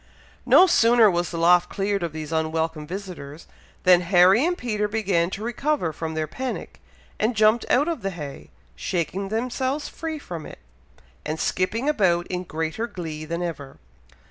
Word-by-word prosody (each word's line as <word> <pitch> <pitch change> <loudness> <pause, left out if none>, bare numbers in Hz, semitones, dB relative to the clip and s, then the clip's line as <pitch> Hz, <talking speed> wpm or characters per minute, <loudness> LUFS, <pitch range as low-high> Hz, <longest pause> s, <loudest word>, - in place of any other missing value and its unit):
No 370 - +8
sooner 230 - +5
was 175 0 -1
the 170 - -5
loft 175 +2 +4
cleared 200 0 -1
of 170 -2 -2
these 155 0 -7
unwelcome 160 -1 -1
visitors, 175 -5 -8 0.4
than 180 -1 +6
Harry 185 +6 +5
and 355 +2 0
Peter 210 -4 -1
began 200 -5 0
to 200 +2 -6
recover 240 - -1
from 160 +1 -5
their 155 0 -1
panic, 255 - -6 0.4
and 225 +3 +1
jumped 215 +2 +3
out 285 +5 +3
of 330 -7 -2
the 195 - -2
hay, 150 -7 -8 0.3
shaking 180 - -2
themselves 255 +6 -2
free 320 -1 -5
from 170 - -7
it, - - -11 0.7
and 155 +1 -4
skipping 220 +8 -1
about 185 -12 +2
in 180 0 -3
greater 160 +8 -3
glee 160 -7 -6
than 170 +2 -3
ever. 145 -6 -6
185 Hz, 165 wpm, -24 LUFS, 165-225 Hz, 0.7 s, No